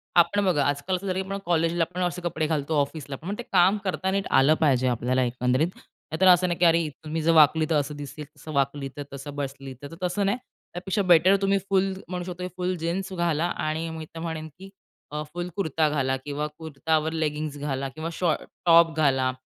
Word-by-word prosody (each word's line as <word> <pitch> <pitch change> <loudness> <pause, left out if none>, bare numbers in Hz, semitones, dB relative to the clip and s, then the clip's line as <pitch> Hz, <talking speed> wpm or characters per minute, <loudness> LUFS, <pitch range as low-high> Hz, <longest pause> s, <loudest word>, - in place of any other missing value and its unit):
आपण 200 +4 +4
बघा, 150 -6 +2
आजकाल 145 +6 0
असं 195 +2 -5
झालं 185 0 -1
की 190 - -8
आपण 195 - -2
कॉलेजला 165 0 +2
आपण 180 +2 -4
असे 180 0 -2
कपडे 160 -2 -1
घालतो, 155 0 -1
ऑफिसलापण 145 +2 -5
मग 200 - -2
ते 240 - -5
काम 190 +2 +5
करता 190 0 -1
नीट 195 0 -1
आलं 145 +4 +5
पाहिजे 130 -4 +3
आपल्याला 125 +2 +1
एकंदरीत. 125 +5 +1 0.4
नाहीतर 185 +4 +3
असं 180 0 +6
नाही 175 -1 -2
की 175 - +4
अरे 165 -1 +4 0.2
तुम्ही 155 +1 -3
जर 165 +2 +3
वाकलीतर 155 +1 +5
असं 145 0 0
दिसेल, 145 +1 -7
तसं 155 - -9
वाकलीतर, 140 0 -1
तसं 140 +1 -7
बसलीतर 135 +1 -6
तसं 180 +3 0
नाही. 200 +5 +1 0.4
त्यापेक्षा 190 +3 -1
बेटर 180 +1 +5
तुम्ही 195 0 +3
फुल 195 0 +2
म्हणू 180 0 -4
शकतो 180 0 -5
फुल 180 0 -1
जीन्स 180 +4 -3
घाला 170 -2 0 0.2
आणि 160 +2 -2
मी 160 -1 -6
तर - - -5
म्हणेन 160 -1 -4
की 195 0 -10 0.4
अ, 150 0 -3
फुल 175 0 -3
कुर्ता 160 -5 +1
घाला 135 -3 0
किंवा 145 +1 -2
कुर्तावर 160 0 -1
लेगिंग्ज 150 -2 -2
घाला 135 -2 -2
किंवा 155 +4 -5
शॉर्ट 170 -3 0 0.2
टॉप 165 -1 +6
घाला 135 -4 +2
160 Hz, 195 wpm, -25 LUFS, 145-180 Hz, 0.4 s, असं